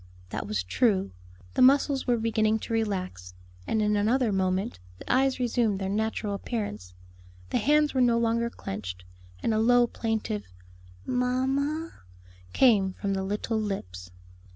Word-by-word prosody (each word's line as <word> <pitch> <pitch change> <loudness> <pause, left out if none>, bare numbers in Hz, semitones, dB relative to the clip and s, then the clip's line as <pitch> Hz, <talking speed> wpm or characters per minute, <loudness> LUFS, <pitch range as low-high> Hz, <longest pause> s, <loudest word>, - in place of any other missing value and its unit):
That - - -4
was 100 -3 -1
true; 190 - +1 0.4
the - - +1
muscles 270 +1 +4
were 245 -1 +3
beginning 220 -1 +1
to 230 - -5
relax, 185 - -3 0.3
and 220 -1 +1
in 210 0 +2
another 225 +3 +2
moment 185 - -1 0.2
the - - -2
eyes 265 0 +2
resumed 235 -4 +1
their 190 0 -3
natural 215 0 -1
appearance, 195 - -5 0.6
the - - +2
hands 300 +1 +3
were 260 - +2
no 240 -2 +4
longer 235 0 +1
clenched, 90 - -7 0.4
and 225 - +1
a 215 - +1
low 245 +2 +5
plaintive, 220 -2 -3 0.6
"Mamma," 270 +6 0 0.6
came 200 - +4
from 195 +1 -3
the 190 - -1
little 210 +3 -2
lips. 90 - -5
220 Hz, 145 wpm, -27 LUFS, 190-245 Hz, 0.6 s, low